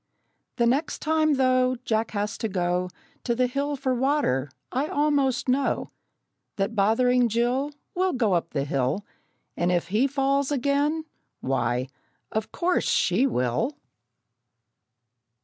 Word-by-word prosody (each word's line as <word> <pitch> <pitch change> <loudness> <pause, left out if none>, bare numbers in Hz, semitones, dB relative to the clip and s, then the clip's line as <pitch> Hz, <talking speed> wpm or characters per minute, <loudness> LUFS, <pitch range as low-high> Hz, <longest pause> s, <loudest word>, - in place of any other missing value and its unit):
The 235 - +2
next 275 +7 +1
time, 310 -1 +2
though, 255 -1 +3
Jack 220 0 0
has 205 0 -2
to 225 - -1
go 180 -1 0 0.3
To 235 - 0
the 250 +1 +2
hill 280 +3 -1
for 260 -1 -1
water, 255 - +1 0.2
I 270 +4 0
almost 285 -4 +1
know 265 +2 0 0.6
That 195 +3 -1
bothering 240 +4 +3
Jill 245 +5 +1 0.2
Will 370 +1 +1
go 230 -7 +1
up 170 -1 0
the 140 -3 -2
hill, 140 +7 -1 0.5
And 175 +1 +1
if 175 0 0
he 220 +8 +3
falls 275 0 +1
again, 285 +3 +1 0.4
why, 125 -1 0 0.4
of 220 0 -2
course 360 +1 0
she 210 +10 +3
will! 175 - 0
250 Hz, 130 wpm, -25 LUFS, 195-280 Hz, 0.6 s, though